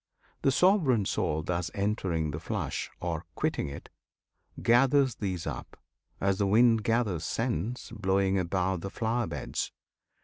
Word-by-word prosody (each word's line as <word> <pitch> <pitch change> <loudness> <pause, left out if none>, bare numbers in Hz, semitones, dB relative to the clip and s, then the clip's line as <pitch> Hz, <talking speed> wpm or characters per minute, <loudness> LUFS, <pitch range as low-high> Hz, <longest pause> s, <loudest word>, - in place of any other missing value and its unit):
The - - +3
Sovereign 150 - +4
Soul 80 -4 0
Thus 85 0 -1
entering 95 -6 0
the 75 - -4
flesh, 80 - -3
or 85 -2 -3
quitting - - -1
it, 70 - -9 0.7
Gathers 130 +2 +4
these 95 -6 -3
up, - - -6 0.4
as 100 0 +1
the 100 - +2
wind 115 +1 +5
gathers 110 -7 +1
scents, 115 +3 -2
Blowing 95 -1 +1
above 90 0 0
the 95 - -4
flower 115 +2 -1
beds. - - -3
100 Hz, 135 wpm, -29 LUFS, 90-120 Hz, 0.7 s, wind